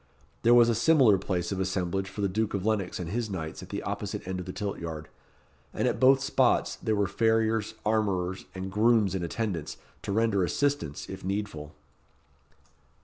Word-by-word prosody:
There 120 +1 +5
was 120 -1 +7
a 120 - +3
similar 115 - +5
place 90 -2 -2
of 95 - -2
assemblage 95 0 -1
for 100 +2 -6
the 100 - +2
Duke 105 +2 -1
of 100 -1 -3
Lennox 105 -5 0
and 90 - -4
his 115 -1 -2
knights 80 -5 -5
at - - -11
the - - -4
opposite - - -4
end 95 0 -3
of 90 - -7
the - - -3
tilt 100 +1 -4
yard; 80 -2 -6 0.7
and - - +1
at - - -1
both 135 +1 +5
spots 135 -3 +2
there 110 -1 -1
were 100 -1 +2
farriers, 110 +1 +1
armourers, 95 -4 0
and 95 0 -5
grooms 105 -2 +3
in 95 - -2
attendance, 85 -3 -3 0.2
to - - -4
render 105 -2 +2
assistance, 140 - -1
if - - -8
needful. 95 -6 -4
100 Hz, 185 wpm, -28 LUFS, 95-110 Hz, 0.7 s, was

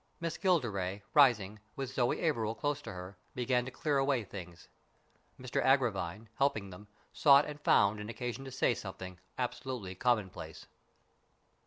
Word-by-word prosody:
Miss 165 -2 -2
Gilderay, 105 - 0
rising, 110 -8 +4 0.2
with 135 -2 -4
Zoe 125 +3 +1
Averil 115 -7 0
close 145 +2 -1
to - - -7
her, 90 +1 -9 0.2
began 125 0 +1
to - - -4
clear 145 0 0
away 135 -3 +2
things. 90 -4 -10 0.7
Mr 125 -1 -1
Agravine, 110 -6 +1
helping 110 -8 +1
them, 90 +3 -11 0.3
sought 140 -1 +6
and 150 0 -7
found 100 +1 +4
an 105 +1 -6
occasion 120 +3 -4
to 135 - -7
say 130 -1 +2
something 95 -3 -7 0.2
absolutely 125 -5 -3
commonplace. 105 -2 -1
120 Hz, 145 wpm, -32 LUFS, 100-135 Hz, 0.7 s, sought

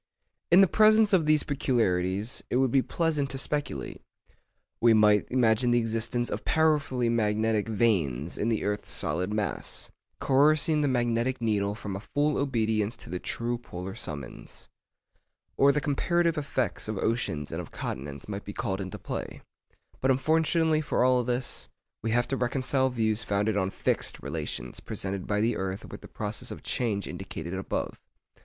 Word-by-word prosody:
In 175 +3 +7
the 195 - +7
presence 215 +1 +5
of 165 -5 +4
these 155 -1 +4
peculiarities, 110 -6 0
it - - -1
would 130 -1 +3
be 135 - +4
pleasant 150 -2 -1
to 135 - -4
speculate. 135 - -3 0.8
We 115 -1 +5
might 105 -1 +4
imagine 120 -1 +3
the 120 - +4
existence 115 +1 -1
of - - -3
powerfully 145 -6 +2
magnetic 110 -1 +1
veins 90 - 0
in 110 - -1
the 110 - 0
earth's 105 0 -2
solid 90 +6 -1
mass, 105 -1 -3 0.3
coercing 150 +3 +4
the 145 - +2
magnetic 120 0 0
needle 105 -3 0
from 105 -2 -5
a - - -4
full 145 +7 0
obedience 110 -5 0
to 80 - -9
the 90 - -2
true 120 +4 -2
polar 95 -5 -7
summons. 75 -9 -8 0.9
Or 140 +1 +5
the 145 - +1
comparative 170 +4 +1
effects 130 - -1
of 110 -2 -3
oceans 90 -10 -1
and - - -3
of - - -10
continents 70 +1 -6
might 100 -1 -5
be 100 - -7
called 95 0 -2
into 95 -1 -6
play. - - -6 0.6
But 130 - +1
unfortunately 160 +3 +2
for 150 - +1
all 125 -1 +4
this, 125 +1 -2 0.3
we 115 - -2
have 120 +2 +2
to 135 - 0
reconcile 130 +1 +1
views 110 -3 0
founded 105 0 0
on 95 -2 +1
fixed - - -1
relations 60 - -5
presented 95 -1 -4
by 105 0 +1
the 115 +2 +1
earth 95 +1 -4
with - - -10
the - - -11
process 105 0 -4
of - - -8
change 105 -5 -1
indicated 90 -2 -6
above. 95 0 -3
115 Hz, 165 wpm, -28 LUFS, 100-135 Hz, 0.9 s, In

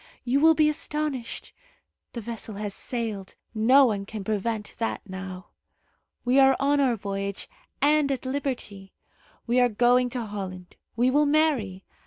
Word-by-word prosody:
You 255 +3 +1
will 320 +2 +6
be 310 -1 +4
astonished. 300 -4 -3 0.6
The 235 - -5
vessel 225 -1 -6
has 205 -1 -4
sailed. 220 -6 -5 0.2
No 250 +5 +5
one 200 -4 -1
can 215 -2 -6
prevent 215 +1 -2
that 225 -1 -3
now. 190 0 -8 0.8
We 250 +3 +4
are 270 0 +5
on 285 +1 +2
our 260 -4 +3
voyage, 200 -1 -4 0.4
and 295 -1 +3
at 265 -1 -3
liberty. 255 -8 -4 0.5
We 245 +1 +2
are 245 -1 +4
going 245 +3 +3
to 235 - -3
Holland. 190 -4 -7 0.2
We 245 +2 +2
will 295 +2 +3
marry. 280 -12 +1
235 Hz, 150 wpm, -26 LUFS, 205-275 Hz, 0.8 s, will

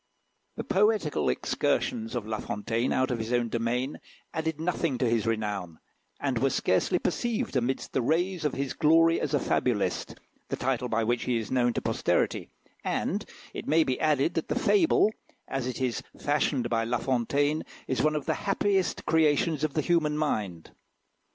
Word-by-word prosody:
The - - -4
poetical 210 +2 +2
excursions 230 -4 -1
of 115 - -2
La 110 -1 -3
Fontaine 115 +3 -2
out 130 0 +1
of 120 - -1
his 110 +1 -4
own 120 -1 +1
domain 120 +4 -1 0.3
added 160 -1 -2
nothing 165 -4 0
to 125 - +1
his 115 -1 +1
renown, 105 -7 -2 0.4
and 135 -4 0
were 135 - +3
scarcely 125 - +1
perceived 215 +2 -1
amidst 130 +1 -1
the 130 - +2
rays 170 +7 0
of 150 - 0
his 140 -1 -2
glory 165 +2 +4
as - - 0
a - - +2
fabulist - - 0 0.3
the - - -1
title 125 -1 -1
by 115 0 +1
which 120 +2 0
he 125 -2 +1
is 110 - -4
known 120 -2 +2
to - - -3
posterity; - - 0 0.3
and - - -1 0.3
it - - -6
may 160 +2 +4
be 130 -4 -1
added, 155 +1 +2
that - - -2
the - - -1
Fable, 330 - +3 0.3
as 135 -2 -2
it 130 - -4
is 125 -3 -1 0.2
fashioned 145 -4 +1
by 115 -1 +1
La 120 +2 0
Fontaine, 140 +5 0 0.2
is - - 0
one 155 0 +2
of 150 - -2
the - - +1 0.2
happiest 195 -1 +1
creations 155 -1 +2
of 155 -3 -1
the 155 - +2
human 155 -2 +1
mind. 105 - -2
135 Hz, 175 wpm, -28 LUFS, 120-160 Hz, 0.4 s, glory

